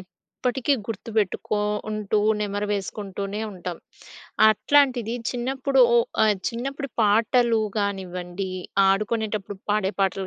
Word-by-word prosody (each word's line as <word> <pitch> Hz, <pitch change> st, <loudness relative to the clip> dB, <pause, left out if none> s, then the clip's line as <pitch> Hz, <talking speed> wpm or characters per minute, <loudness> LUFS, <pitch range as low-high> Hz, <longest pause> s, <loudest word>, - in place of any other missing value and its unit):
ఇప్పటికి 250 Hz, +8 st, -3 dB
గుర్తుపెట్టుకో 215 Hz, -1 st, -2 dB, 0.3 s
ఉంటూ, 215 Hz, 0 st, 0 dB, 0.2 s
నెమరు 205 Hz, 0 st, -2 dB
వేసుకుంటూనే 200 Hz, 0 st, -4 dB
ఉంటం. 180 Hz, -2 st, -6 dB, 0.7 s
అట్లాంటిది 245 Hz, 0 st, +3 dB, 0.2 s
చిన్నప్పుడు 265 Hz, +2 st, 0 dB
ఓహ్! 235 Hz, -1 st, +4 dB, 0.2 s
ఆహ్, 215 Hz, -1 st, +4 dB
చిన్నప్పుడు 275 Hz, +4 st, -4 dB
పాటలు 225 Hz, +2 st, +3 dB, 0.2 s
గానివ్వండి, 185 Hz, -2 st, -3 dB, 0.4 s
ఆడుకునేటప్పుడు 210 Hz, 0 st, -1 dB
పాడే 205 Hz, -2 st, +1 dB
పాటలు 195 Hz, 0 st, 0 dB
215 Hz, 95 wpm, -24 LUFS, 195-235 Hz, 0.7 s, ఓహ్